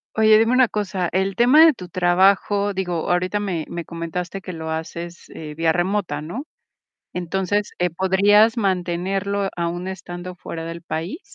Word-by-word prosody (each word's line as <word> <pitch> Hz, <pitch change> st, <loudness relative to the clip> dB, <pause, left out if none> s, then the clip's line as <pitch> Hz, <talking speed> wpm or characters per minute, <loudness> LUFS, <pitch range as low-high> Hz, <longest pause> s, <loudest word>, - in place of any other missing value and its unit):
Oye, 215 Hz, 0 st, +6 dB
dime 225 Hz, +2 st, +3 dB
una 255 Hz, -1 st, +5 dB
cosa, 190 Hz, -4 st, -2 dB
el 190 Hz, +1 st, 0 dB
tema 275 Hz, +7 st, +7 dB
de 320 Hz, -, +7 dB
tu 180 Hz, -6 st, -10 dB
trabajo, 195 Hz, +3 st, +2 dB
digo, 180 Hz, -3 st, -2 dB
ahorita 185 Hz, +3 st, +1 dB
me 180 Hz, -6 st, -2 dB
me 170 Hz, -1 st, -5 dB
comentaste 170 Hz, +3 st, -5 dB
que 185 Hz, -, -7 dB
lo 160 Hz, -1 st, -6 dB
haces, 170 Hz, +2 st, -6 dB
eh, 150 Hz, -2 st, -8 dB
vía 165 Hz, 0 st, +2 dB
remota, 175 Hz, -3 st, -1 dB
¿no?, 195 Hz, -, -6 dB, 0.7 s
entonces, 190 Hz, +3 st, -1 dB
eh, 180 Hz, 0 st, +1 dB
¿podrías 200 Hz, +6 st, +4 dB
mantenerlo 195 Hz, +1 st, -1 dB
aun 175 Hz, +1 st, -3 dB
estando 180 Hz, -1 st, -7 dB
fuera 165 Hz, -2 st, -7 dB
del 165 Hz, 0 st, -6 dB
país? 175 Hz, -, -4 dB
185 Hz, 160 wpm, -22 LUFS, 170-200 Hz, 0.7 s, tema